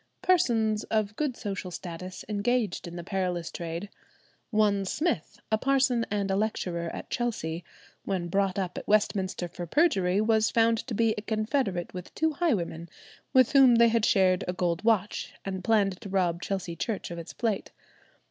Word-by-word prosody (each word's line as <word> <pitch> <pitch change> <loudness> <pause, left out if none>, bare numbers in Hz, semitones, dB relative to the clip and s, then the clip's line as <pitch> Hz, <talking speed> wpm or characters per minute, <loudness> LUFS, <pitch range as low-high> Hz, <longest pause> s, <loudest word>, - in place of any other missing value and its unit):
Persons 225 -12 +2
of 215 -2 -1
good 285 -3 -2
social 200 -3 -4
status 180 +1 -7
engaged 215 -1 0
in 170 - -8
the 175 - -6
perilous 180 -2 -2
trade. 170 +3 -5 0.6
One 210 -3 +2
Smith, 245 - -2
a 220 - +3
parson 265 -3 +2
and 200 -1 -1
a - - +2
lecturer 180 -5 -1
at - - -8
Chelsea, 180 -9 -2 0.4
when 185 -3 -2
brought 195 +1 0
up 185 -2 -2
at - - -12
Westminster 205 -4 +1
for 175 0 -7
perjury, 195 - +3
was 220 0 +3
found 230 0 +3
to 235 - -3
be 225 0 +3
a - - -7
confederate 215 -4 -1
with 180 -1 -8
two 320 0 +1
highwaymen, 175 - -1 0.4
with 255 -2 +5
whom 265 -3 +7
they 235 0 +6
had 230 -1 +1
shared 185 -3 +3
a 180 - -1
gold 175 0 -1
watch, 215 -3 0
and 190 -1 -4
planned 200 -4 +2
to 205 - -7
rob 180 -3 +1
Chelsea 190 -4 -3
Church 200 +2 -3
of 170 - -5
its 165 - -8
plate. 220 -4 -2
200 Hz, 170 wpm, -28 LUFS, 180-225 Hz, 0.6 s, whom